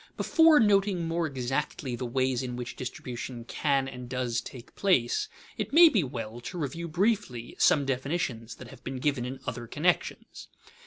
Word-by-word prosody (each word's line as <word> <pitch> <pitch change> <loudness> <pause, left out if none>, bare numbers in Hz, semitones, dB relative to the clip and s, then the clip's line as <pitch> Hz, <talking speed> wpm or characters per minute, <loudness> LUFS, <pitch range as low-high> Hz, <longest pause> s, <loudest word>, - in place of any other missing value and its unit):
_ - - -37
Before 320 -2 +5
noting 195 -5 +3
more 165 0 0
exactly 135 -1 -3
the 125 0 -4
ways 130 0 0
in 125 -2 -4
which 125 0 -6
distribution 120 -1 -6
can 140 0 0
and 125 -2 -8
does 125 -2 -1
take 125 -2 -11
place, 155 -12 +2 0.3
it - - -3
may 335 +2 +9
be 210 - +2
well 120 -4 -5
to 180 - -6
review 165 +2 -3
briefly 170 - -1
some 145 -2 +4
definitions 130 -3 -2
that 125 - -11
have 130 -1 -14
been 130 0 -4
given 130 -2 0
in 130 +1 -5
other 120 -1 -5
connections. 170 +8 -1
130 Hz, 170 wpm, -28 LUFS, 125-170 Hz, 0.3 s, may